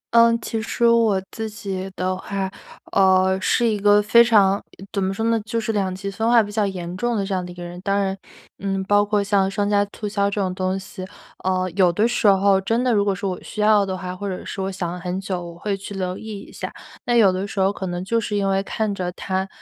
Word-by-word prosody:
嗯， 230 0 +6
其 225 0 -3
实 230 +1 -1
我 230 -4 +4
自 220 -1 -4
己 195 -3 -5
的 185 0 -1
话， 190 0 -3 0.4
呃， 190 -1 +4
是 235 +5 +2
一 215 -3 +1
个 205 +1 +5
非 220 +3 +6
常 205 -4 +4 0.3
怎 200 - -1
么 190 0 0
说 220 - -3
呢， 230 0 +2
就 230 +1 -3
是 225 0 -1
两 195 -3 -1
极 200 +1 -5
分 220 +3 -2
化 235 -1 +6
比 205 - -7
较 210 0 +1
严 180 -2 -5
重 240 +3 0
的 200 -2 -1
这 195 - -3
样 185 -1 -1
的 - - -9
一 175 - -9
个 175 - -8
人。 175 +1 -8
当 200 +2 0
然， 195 -1 0 0.4
嗯， 195 -1 -2
包 205 +1 +3
括 205 0 +1
像 200 -1 +2
商 205 +1 -1
家 205 -1 +3
促 210 - -4
销 200 -1 +1
这 200 0 -2
种 185 -1 -1
东 185 0 -1
西， 190 -1 -8 0.4
呃， 185 -1 0
有 180 -3 +4
的 210 +5 +2
时 240 - +1
候 195 0 +5
真 225 +5 0
的 255 - +2
如 205 -2 +2
果 200 -1 +1
说 195 +1 -3
我 180 - -6
需 210 - -6
要 210 -1 +5
的 190 -1 -3
话， 180 -1 -5
或 200 +2 -5
者 185 -2 -4
是 - - -7
我 190 0 -1
想 180 -3 -3
了 180 - -6
很 180 +1 -3
久， 190 -2 -3
我 170 -1 -9
会 200 +2 -2
去 200 +1 -8
留 185 -1 -3
意 215 -2 -7
一 - - -13
下。 - - -5 0.4
那 240 - +1
有 215 -5 +6
的 185 +2 -3
时 195 - -2
候 190 +1 +3
可 195 - -6
能 175 0 -3
就 230 +4 +1
是 215 -2 -3
因 200 -1 +1
为 195 0 +2
看 215 0 -2
着 185 -2 -3
它 190 +1 -2
195 Hz, 285 characters per minute, -22 LUFS, 190-210 Hz, 0.4 s, 嗯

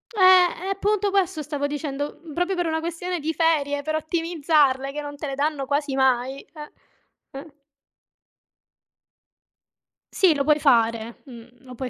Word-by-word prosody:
Eh, 370 -2 +5
e - - -4
appunto 405 +1 0
questo 380 -5 0
stavo 290 -1 -3
dicendo, 290 0 -4
mhmm, 325 -3 -11
proprio 355 +2 0
per 350 -2 -1
una 320 0 -1
questione 345 +2 -4
di 320 +2 -2
ferie, 295 -4 +1
per 310 +2 -3
ottimizzarle 310 -4 +1
che 295 +1 -5
non 290 0 -8
te 300 - -6
le 275 - -4
danno 290 0 -1
quasi 285 0 -1
mai, 265 0 +1
eh, 300 -2 -10 0.7
eh. 305 +1 -13 2.6
Sì, 370 -6 +4
lo 280 - 0
puoi 300 +1 +3
fare, 230 -4 +1
mh, 235 -4 -12 0.2
lo 255 - -11
puoi 255 +1 -5
300 Hz, 155 wpm, -23 LUFS, 275-335 Hz, 2.6 s, Eh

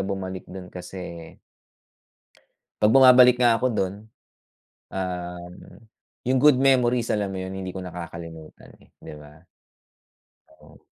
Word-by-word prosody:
bumalik 95 -1 -5
dun 90 -1 -10
kasi 90 -2 -9 1.5
'pag 105 +3 +4
bumabalik 125 -2 +7
nga 115 -2 +4
ako 130 - 0
dun, 95 -1 -1 1.0
uhm, 90 -1 -6 0.7
yung 130 +1 +2
good 150 -3 +6
memories 125 -3 +2
alam 100 -2 -1
mo 95 - -6
yun? 95 +1 -6
Hindi 95 -1 -6
ko 95 - -8
nakakalimutan, 85 -2 -10
eh, - - -23
'di - - -11
ba? 75 +3 -16 1.0
Oo. - - -20
95 Hz, 120 wpm, -24 LUFS, 90-120 Hz, 1.5 s, bumabalik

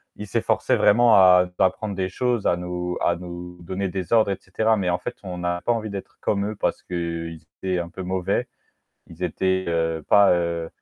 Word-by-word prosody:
ils 105 - -7
s'efforçaient 95 - +1
vraiment 115 +2 +5
à 90 -2 +7
t'apprendre 100 +2 +1
des 95 -1 -2
choses, 120 +1 0
à 85 - +2
nous 90 0 -4
à 85 - +2
nous 90 0 -9
donner 95 +3 -3
des 95 +2 -4
ordres 110 -3 +4
et 95 - -2
cetera, 110 +4 +1
mais 90 -2 0
en 90 - +1
fait, 120 - -5
on 90 -2 -6
a 90 0 -1
pas 120 - +1
envie 110 -2 -3
d'être 100 -1 -8
comme 100 -1 0
eux 110 - -5
parce - - -1
qu'ils 85 -2 -4 0.2
étaient 95 -1 -1
un 85 0 -3
peu 95 - -8
mauvais. 95 0 -1 0.6
Ils 85 +2 -11
étaient, 95 +2 0
heu, 80 -2 -1
pas, 100 -1 +6
heu 85 -1 -1
90 Hz, 205 wpm, -23 LUFS, 90-100 Hz, 0.6 s, à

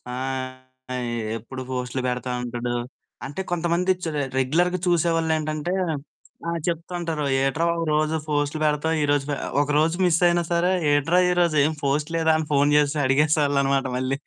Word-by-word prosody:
ఆహ్ 130 0 -3 0.4
ఎ - - -2 0.4
ఎప్పుడు 130 +4 -8
పోస్టులు 125 0 -3
పెడతా 125 0 -3
ఉంటడు, 120 0 -3 0.5
అంటే, 145 +7 -5
కొంతమంది 175 +2 +1
చ్ - - -2 0.3
రెగ్యులర్‌గా 175 +8 +1
చూసేవాళ్ళేంటంటే 160 -1 0 0.7
ఆ! - - 0 0.2
చెప్తా 170 +1 -3
ఉంటారు, 160 -3 -2 0.2
"ఏట్రా 135 +5 +1
బాబు 170 0 -1
రోజూ 155 +1 +1
ఫోస్ట్‌లు 145 +1 0
పెడతావు, 150 +2 +1
ఈరోజు 145 -1 +1
పె" 145 - 0 0.3
ఒకరోజు 150 +3 +2
మిస్సయినా 175 0 +3
సరే, 175 +2 +2 0.2
"ఏట్రా 165 +5 +3
ఈరోజు 175 -3 +2
ఏం 160 - 0
పోస్ట్ 145 +3 0
లేదా?" 160 -1 +3
అని 160 - -3
ఫోను 145 0 +3
చేసి 150 +1 +2
అడిగేసేవాళ్ళనమాట 140 -1 +2
మళ్ళీ. 130 +1 -1
150 Hz, 145 wpm, -24 LUFS, 135-165 Hz, 0.7 s, మిస్సయినా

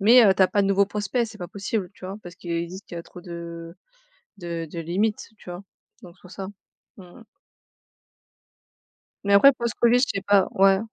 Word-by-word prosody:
Mais 235 +5 +7
heu, 195 -2 +5
tu 190 - +4
as 185 - +5
pas 205 - +2
de - - +1
nouveaux 195 0 +3
prospects, 210 +4 -1
c'est 215 -1 -12
pas 175 - -6
possible, 200 -1 -3
tu - - -13
vois? 195 +2 -5
Parce 175 0 -10
qu'ils 170 -3 -3
disent 185 +4 -9
qu'il 175 - -10
a - - -6
trop 180 - -13
de 170 -1 -8 0.6
de 170 -2 -4
de 170 - -5
limites 200 +6 -1
tu - - -11
vois? 175 +2 -7 0.4
Donc 180 0 -13
c'est - - -28
pour 180 - -14
ça. 190 0 -6 0.5
Mmh 190 - -12
mh. 180 +7 -15 2.0
Mais 200 0 +2
après, 275 +8 +8
post-Covid 235 0 +2
je 270 - +3
sais - - -3
pas. 200 -2 +5
Ouais. 195 0 +4
195 Hz, 210 wpm, -24 LUFS, 175-205 Hz, 2.0 s, après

